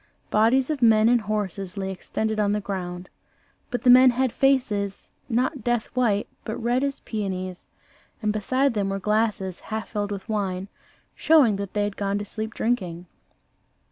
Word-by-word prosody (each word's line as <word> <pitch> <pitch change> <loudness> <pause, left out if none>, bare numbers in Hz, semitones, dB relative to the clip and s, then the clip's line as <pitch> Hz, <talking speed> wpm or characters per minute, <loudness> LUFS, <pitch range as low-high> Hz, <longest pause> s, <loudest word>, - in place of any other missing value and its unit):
Bodies 250 +6 +3
of 290 -4 -3
men 220 -2 +5
and 240 0 +4
horses 200 -3 -3
lay 190 -1 -2
extended 220 +3 -3
on 205 -1 +2
the 210 - 0
ground; 185 -3 -5 0.6
but 245 - -3
the 250 - +4
men 255 +1 +8
had 255 0 +1
faces, 220 -8 0 0.2
not 250 +2 0
death 240 +1 -1
white, 220 -5 +1 0.2
but 220 - -4
red 240 +3 0
as 280 -1 -2
peonies, 185 -4 -4 0.5
and 215 -2 0
beside 255 +6 +1
them 200 -3 -1
were 195 - -1
glasses 210 -2 0
half 220 0 -5
filled 205 -2 -3
with 195 -2 -6
wine, 195 -3 -2 0.4
showing 285 -10 +4
that 200 -1 -5
they 210 -1 +1
had 205 -1 -3
gone 200 0 -1
to 205 - -4
sleep 220 +2 -5
drinking. 185 -7 -2
215 Hz, 170 wpm, -24 LUFS, 195-240 Hz, 0.6 s, men